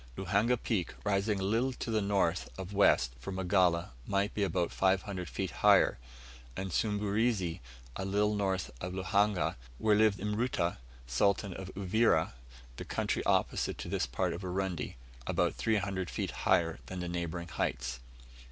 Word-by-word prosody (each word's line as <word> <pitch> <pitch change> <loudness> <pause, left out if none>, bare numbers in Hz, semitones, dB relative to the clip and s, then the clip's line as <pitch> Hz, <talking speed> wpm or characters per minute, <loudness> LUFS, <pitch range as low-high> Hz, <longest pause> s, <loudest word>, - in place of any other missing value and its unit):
Luhanga 110 +6 +2
Peak, 110 -6 -2
rising 100 0 +1
a - - -2
little 115 +6 +1
to 120 - -4
the 110 -1 +2
north 95 -4 +1
of 95 +1 -6
west 65 -11 +4
from 60 +10 -6
Magala, 90 -4 +2 0.2
might 100 +1 0
be 105 - -2
about 90 -3 0
500 95 -2 0
feet - - -3
higher; - - +4 0.6
and 95 -1 -3
Sumburizi, 105 -2 0 0.4
a - - -3
little 105 +2 +1
north 95 -3 -1
of 90 +1 -4
Luhanga, 100 0 +1 0.2
where 105 +5 +3
lived 105 -1 +4
Mruta, 105 - -1 0.3
Sultan 95 - +1
of 95 +1 -7
Uvira, 100 - +2 0.4
the - - -5
country - - -1
opposite - - +1
to - - -6
this - - 0
part 85 +8 -1
of 85 - -6
Urundi, 95 -1 -3 0.3
about - - +1
300 100 -4 -1
feet - - -3
higher 80 -1 +1
than 95 - -5
the 90 - -3
neighbouring 85 0 -3
heights. 65 -6 -2
95 Hz, 150 wpm, -32 LUFS, 90-105 Hz, 0.6 s, west